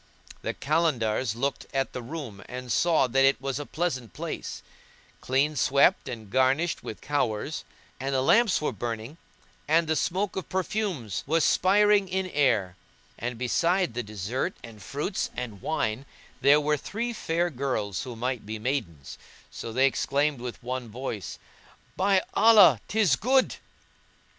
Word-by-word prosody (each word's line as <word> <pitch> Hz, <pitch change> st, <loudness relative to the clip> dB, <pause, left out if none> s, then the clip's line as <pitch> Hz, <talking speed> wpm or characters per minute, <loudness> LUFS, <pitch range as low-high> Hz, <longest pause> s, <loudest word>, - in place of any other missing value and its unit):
The -, -, -3 dB
Kalandars 130 Hz, -7 st, 0 dB
looked 140 Hz, +4 st, -2 dB
at 135 Hz, 0 st, 0 dB
the 125 Hz, -, -4 dB
room 120 Hz, -7 st, -7 dB
and 125 Hz, -1 st, -6 dB
saw 165 Hz, +3 st, +3 dB
that 135 Hz, +2 st, +2 dB
it 135 Hz, +1 st, +4 dB
was 135 Hz, +1 st, -3 dB
a 145 Hz, -, -6 dB
pleasant 130 Hz, -, -3 dB
place, -, -, -6 dB, 0.6 s
clean 140 Hz, +4 st, +1 dB
swept 140 Hz, +2 st, +3 dB
and 110 Hz, -3 st, -7 dB
garnished 130 Hz, -, +1 dB
with 110 Hz, -, -8 dB
flowers; 140 Hz, 0 st, -1 dB, 0.4 s
and 135 Hz, +1 st, -2 dB
the 130 Hz, -, +2 dB
lamps 225 Hz, -, +4 dB
were 150 Hz, -, -1 dB
burning 115 Hz, -, -5 dB, 0.5 s
and 165 Hz, +2 st, +4 dB
the 160 Hz, -, +1 dB
smoke 185 Hz, +6 st, -1 dB
of 190 Hz, -, -5 dB
perfumes 185 Hz, -, -2 dB
was 160 Hz, +2 st, +2 dB
spireing 205 Hz, +1 st, +4 dB
in 190 Hz, 0 st, -1 dB
air; 110 Hz, -11 st, +2 dB, 0.4 s
and 120 Hz, +1 st, -3 dB
beside 170 Hz, +7 st, +1 dB
the 120 Hz, -, -2 dB
dessert 110 Hz, -, -3 dB
and 110 Hz, -3 st, -11 dB
fruits 145 Hz, -, -3 dB
and 110 Hz, -6 st, -6 dB
wine, 135 Hz, -4 st, -2 dB, 0.3 s
there 145 Hz, +2 st, +6 dB
were 150 Hz, 0 st, +1 dB
three 235 Hz, -, -4 dB
fair 175 Hz, -4 st, -1 dB
girls 120 Hz, -8 st, -2 dB
who 125 Hz, -3 st, -6 dB
might 125 Hz, 0 st, -2 dB
be 110 Hz, +2 st, -5 dB
maidens; 105 Hz, -, -4 dB, 0.3 s
so 115 Hz, -, -6 dB
they 130 Hz, +4 st, +3 dB
exclaimed 140 Hz, +1 st, +1 dB
with 125 Hz, 0 st, -7 dB
one 125 Hz, -1 st, -4 dB
voice, 115 Hz, -4 st, -5 dB, 0.6 s
"By 190 Hz, 0 st, +3 dB
Allah, 200 Hz, -, +7 dB
'tis 205 Hz, -9 st, +3 dB
good!" 260 Hz, -, +2 dB
135 Hz, 150 wpm, -27 LUFS, 120-165 Hz, 0.6 s, Allah